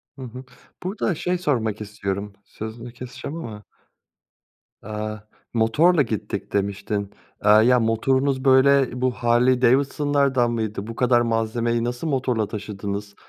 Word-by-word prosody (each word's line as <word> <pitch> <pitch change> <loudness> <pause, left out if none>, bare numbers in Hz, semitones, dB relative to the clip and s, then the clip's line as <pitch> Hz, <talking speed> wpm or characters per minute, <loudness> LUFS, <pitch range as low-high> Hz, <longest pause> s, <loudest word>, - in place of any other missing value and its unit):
Hı 135 - -11
hı. 125 +1 -8 0.4
Burada 190 -2 -1
şey 180 +3 -1
sormak 115 - -1
istiyorum, 100 -1 -4
sözünü 115 +2 -8
keseceğim 130 +5 -7
ama. 110 -8 -7 1.2
Aaa, 110 0 -5 0.3
motorla 145 +9 +4
gittik 110 -6 -3
demiştin. 100 0 -1 0.4
Eee, - - +5
ya, 120 +4 +6
motorunuz 130 +4 +1
böyle 130 -1 +4
bu 130 0 +2
Harley 120 +3 +2
Davidson'lardan 135 -1 +2
mıydı? 110 -2 -3
Bu 115 - -6
kadar 120 -1 +3
malzemeyi 115 0 0
nasıl 120 +6 -3
motorla 125 -6 0
taşıdınız? 100 -1 -5
120 Hz, 120 wpm, -23 LUFS, 110-130 Hz, 1.2 s, ya